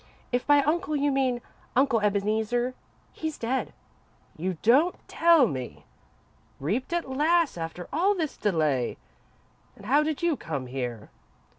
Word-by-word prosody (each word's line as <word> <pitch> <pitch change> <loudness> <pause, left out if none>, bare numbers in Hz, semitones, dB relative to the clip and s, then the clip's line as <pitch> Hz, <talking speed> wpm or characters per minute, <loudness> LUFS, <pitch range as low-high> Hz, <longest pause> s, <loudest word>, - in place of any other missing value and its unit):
"If 245 0 -1
by 290 -1 +5
'uncle' 310 +2 0
you 285 0 +1
mean 260 -3 +1 0.3
Uncle 260 -2 +3
Ebeneezer, 215 +4 0 0.4
he's 315 -1 -4
dead." 250 +3 -2 0.6
"You 180 +2 -3
don't 285 +11 +4
tell 335 -5 +5
me! 125 - -5 0.7
Reaped 210 - -2
at 345 -3 -1
last, 310 +5 +2
after 165 +1 -6
all 380 +7 +3
this 320 -5 -2
delay! 155 - 0 0.8
Then - - -15
how 270 +8 +3
did 310 +1 -2
you 340 -3 +2
come 145 - -5
here?" 125 -4 -5
250 Hz, 135 wpm, -27 LUFS, -, 0.8 s, by